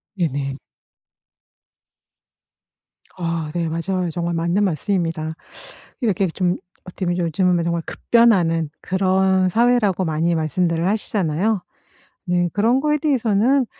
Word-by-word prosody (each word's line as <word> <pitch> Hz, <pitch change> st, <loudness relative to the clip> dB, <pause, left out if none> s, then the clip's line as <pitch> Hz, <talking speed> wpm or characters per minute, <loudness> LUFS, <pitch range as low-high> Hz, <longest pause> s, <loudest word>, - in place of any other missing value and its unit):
네네. 140 Hz, -6 st, -2 dB, 2.6 s
아 165 Hz, -3 st, -3 dB
네 170 Hz, -1 st, -1 dB
맞아요. 175 Hz, +2 st, -2 dB
정말 170 Hz, +1 st, -2 dB
맞는 170 Hz, +5 st, +1 dB
말씀입니다. 165 Hz, -3 st, -1 dB, 0.7 s
이렇게 200 Hz, -5 st, +1 dB
좀 180 Hz, +1 st, -1 dB, 0.3 s
어떻게 180 Hz, 0 st, -6 dB
보면 175 Hz, 0 st, 0 dB
요즘은 175 Hz, +1 st, +1 dB
정말 170 Hz, 0 st, -1 dB
급변하는 175 Hz, -10 st, +2 dB
그런 190 Hz, 0 st, +2 dB
사회라고 225 Hz, -4 st, +2 dB
많이 165 Hz, +2 st, 0 dB
말씀들을 165 Hz, +2 st, 0 dB
하시잖아요. 200 Hz, -1 st, 0 dB, 0.7 s
네 175 Hz, 0 st, +2 dB
그런 230 Hz, +6 st, +2 dB
거에 300 Hz, 0 st, +1 dB
대해서는 255 Hz, -2 st, +2 dB
180 Hz, 260 characters per minute, -21 LUFS, 165-205 Hz, 2.6 s, 급변하는